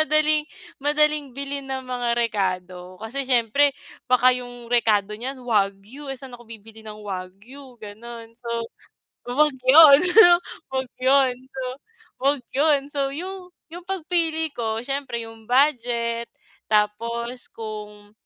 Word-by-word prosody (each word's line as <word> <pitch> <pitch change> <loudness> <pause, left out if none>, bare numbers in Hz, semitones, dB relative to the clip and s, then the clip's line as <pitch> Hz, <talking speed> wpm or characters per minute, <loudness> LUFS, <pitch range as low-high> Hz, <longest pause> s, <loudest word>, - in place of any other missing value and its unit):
madaling 305 0 +2 0.4
madaling 300 +1 +2
bilhin 280 0 -5
na 265 -1 -4
mga 250 -1 -3
rekado. 185 -5 -2
Kasi 255 +6 -5
siyempre 260 +4 +3 0.3
baka 250 0 +5
yung 245 -1 -7
rekado 210 -4 +2
niyan 250 +6 -5
wagyu. 210 +5 -1
Eh 270 - -4
saan 260 0 -11
ako 240 -1 -13
bibili 225 0 -12
ng 215 -1 -10
wagyu, 205 +8 -9
gano'n. 230 +2 -10
So, 240 - -9 0.8
'wag 295 +2 +3
yun, 280 +2 +9 0.7
'wag 265 -1 -3
yun. 265 0 +4 0.2
So, 265 0 -7 0.6
'wag 275 +1 +1
'yun. 285 +1 +3
So 285 - -2
yung 370 +3 -6 0.2
yung 350 +2 -10
pagpili 325 -3 -1
ko, 225 -3 -3
siyempre 265 -3 -3
yung 225 -1 -13
budget, 235 -3 +1 0.4
tapos 235 +3 -1
kung 210 -2 -9
245 Hz, 125 wpm, -23 LUFS, 220-280 Hz, 0.8 s, yun